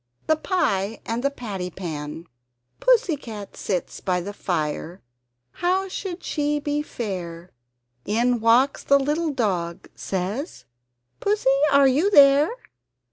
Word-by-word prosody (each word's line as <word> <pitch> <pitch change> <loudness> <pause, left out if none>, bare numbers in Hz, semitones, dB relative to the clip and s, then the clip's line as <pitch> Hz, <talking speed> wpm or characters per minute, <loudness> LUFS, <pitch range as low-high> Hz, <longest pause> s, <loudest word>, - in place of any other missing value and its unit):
THE 315 - +3
PIE 225 - -1
AND 230 +1 -2
THE 280 - +3
PATTY 205 -9 -5
PAN 160 -3 -6 0.5
Pussy - - +3
cat 220 -7 -9
sits 180 -4 -3
by 180 -2 0
the 200 +4 -6
fire 170 -1 -3 0.5
how 375 +2 0
should 370 -1 -6
she 295 -1 -1
be 290 0 -1
fair? 180 - -6 0.5
In 235 +3 +1
walks 235 +5 +3
the 280 - +5
little 300 +4 0
dog 185 - -2
says 200 - -4 0.5
"Pussy 410 -9 +2 0.2
are 280 -1 +6
you 295 +10 +3
there? 285 -3 +6
245 Hz, 125 wpm, -24 LUFS, 185-295 Hz, 0.5 s, are